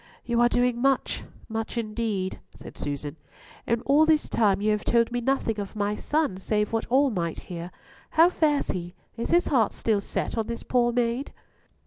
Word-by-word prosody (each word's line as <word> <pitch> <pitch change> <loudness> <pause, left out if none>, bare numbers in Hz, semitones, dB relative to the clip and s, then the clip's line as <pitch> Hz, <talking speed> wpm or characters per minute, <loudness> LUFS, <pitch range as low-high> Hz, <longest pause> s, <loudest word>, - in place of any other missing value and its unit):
"You 235 -1 +1
are 240 - +5
doing 245 0 +1
much, 270 0 +1 0.2
much 225 +1 -4
indeed," 215 -4 -2 0.2
said - - -11
Susan; 145 +1 -5 0.5
"and 235 +1 0
all 290 +3 +5
this 310 -1 +3
time 205 -4 +2
you 215 +1 +1
have 210 0 0
told 235 0 +2
me 245 0 -1
nothing 235 -4 0
of 200 +1 -6
my 205 0 0
son, 295 -6 0
save 210 +2 -1
what 225 - -1
all 270 +2 +3
might 170 -5 -2
hear. 175 -1 -7 0.4
How 325 +2 +6
fares 300 -4 +1
he? 175 0 -6 0.2
is 230 - -4
his 345 +1 +4
heart 235 -7 +2
still 215 -3 0
set 225 - -3
on 220 - -1
this 235 - -5
poor 240 -1 +2
maid?" 245 +3 -1
230 Hz, 185 wpm, -26 LUFS, 205-250 Hz, 0.5 s, How